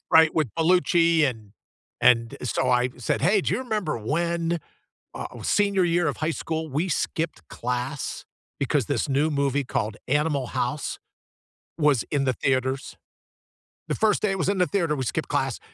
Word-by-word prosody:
right, 160 -1 +7
with 155 -7 +1
Bellucci, 170 0 +4 0.2
and 115 -3 -8 0.7
and, 115 -2 +5 0.2
eh, - - -4
so, - - +2 0.2
I 125 - 0
said, 125 - -1
"Hey, 200 +4 +4
do - - -1
you - - 0
remember 210 - -1
when 170 +7 -1 0.6
ah - - -3
oh - - -9 0.2
senior 200 -3 +3
year 175 -1 +2
of - - -2
high 165 - -1
school, 160 0 -2
we 165 - +2
skipped 165 -2 -2 0.2
class, 125 +3 -3 0.4
because 140 -1 +1
this 145 0 0
new 155 +2 +3
movie 140 0 +1
called 110 -3 0
Animal 145 -2 +1
House, 140 +4 -1 1.0
was 135 -5 +4 0.2
in 140 - +2
the 130 - +2
theaters?" 130 0 +1 1.0
The - - 0
first 210 - +3
day 210 -2 +1
it 195 - -1
was - - -1
in 195 -1 +1
the 180 - +4
theater, 165 -6 +1
we 130 - -2
skipped - - -2
class, - - 0
155 Hz, 175 wpm, -25 LUFS, 130-175 Hz, 1.0 s, right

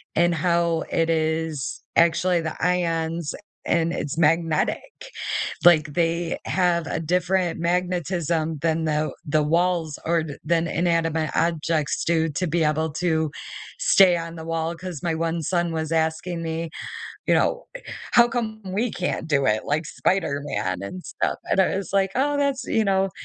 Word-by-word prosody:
and 175 +1 +3
how 170 0 +1
it 165 0 +1
is 160 -2 -1
actually 170 +1 +3
the 160 -1 -4
ions 165 -2 0
a - - -7 0.3
and 170 0 +2
it's 140 - -3
magnetic. 165 - 0 0.6
Like 155 -4 +6
they 170 0 0
have 175 -2 +1
a - - -2
different 180 +2 0
magnetism 170 -2 0
than 165 0 +1
the 155 0 0
the 155 0 +2
walls 165 0 +1
or 165 0 +2 0.2
than 165 +1 +1
inanimate 165 -2 0
objects 165 -2 0
do 165 -1 +2
to 155 +5 -2
be 165 +1 +1
able 155 +1 +1
to 160 -3 +1 0.5
stay 195 - +5
on 165 0 -6
the 160 - -8
wall 165 0 -2
'cause 175 -3 -7
my 165 -2 0
one 165 0 -1
son 175 +1 0
was 160 0 -3
asking 165 +2 -1
me, 165 0 -3 0.6
you - - +4
know, - - +1 0.5
"How 240 -1 +7
come 225 -2 -3
we 205 +6 -1
can't 180 -4 -3
do 140 -3 +2
it 110 -2 +1
like 150 +2 -1
Spider-Man 145 - -1
and 175 - -7
stuff?" - - -2
And - - +4
I 190 - +2
was 195 -3 -4
like, 195 -1 +2
"Oh, 290 +2 +2
that's, 280 -2 0
you 220 - +1
know 195 -1 +2
165 Hz, 155 wpm, -24 LUFS, 160-180 Hz, 0.6 s, How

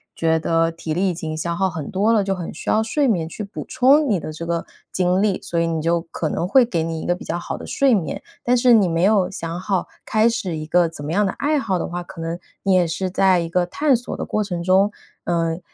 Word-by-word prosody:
觉 160 0 +1
得 165 +1 +1
体 165 -1 -5
力 190 +2 +1
已 - - -1
经 160 -2 -5
消 170 +2 -2
耗 190 +1 +1
很 160 -5 -6
多 205 +4 +2
了， 210 -3 +3
就 195 - 0
很 175 -2 -5
需 - - -6
要 220 - +3
睡 275 +6 +1
眠 175 -9 +1
去 210 - -6
补 200 - -7
充 280 +3 +4
你 200 -5 +2
的 155 - -6
这 165 +2 -6
个 170 -1 -1 0.3
精 180 +1 +1
力， 205 -3 +1
所 170 - -2
以 165 - +1
你 165 -1 -1
就 170 +1 +1
可 160 - -3
能 175 - -2
会 255 +5 +5
给 175 -8 -1
你 165 0 -3
一 - - -6
个 175 - +2
比 - - -10
较 170 - -3
好 175 - -5
的 - - -9
睡 275 -3 +3
眠。 175 -8 -1 0.2
但 250 +1 +3
是 245 0 +5
你 205 -5 +5
没 165 +1 0
有 200 -2 +3
想 165 -2 -5
好 185 -1 -1 0.2
开 220 +1 +3
始 185 -7 -3
一 155 - -5
个 170 +2 +3
怎 145 -3 -9
么 155 - -3
样 205 +4 +2
的 190 - -1
爱 300 +1 0
好 195 -8 -1
的 - - -3
话， 175 +1 -4
可 175 - -11
能 165 +1 -4 0.2
你 195 -1 +2
也 180 -2 +4
是 185 +3 -2
在 190 -1 +3
一 170 - -2
个 175 +1 +1
探 285 +7 +2
索 245 +1 -4
的 - - -3
过 215 - -1
程 175 -4 -4
中。 190 +3 +3 0.3
呃， 165 -1 0
180 Hz, 295 characters per minute, -21 LUFS, 165-210 Hz, 0.3 s, 会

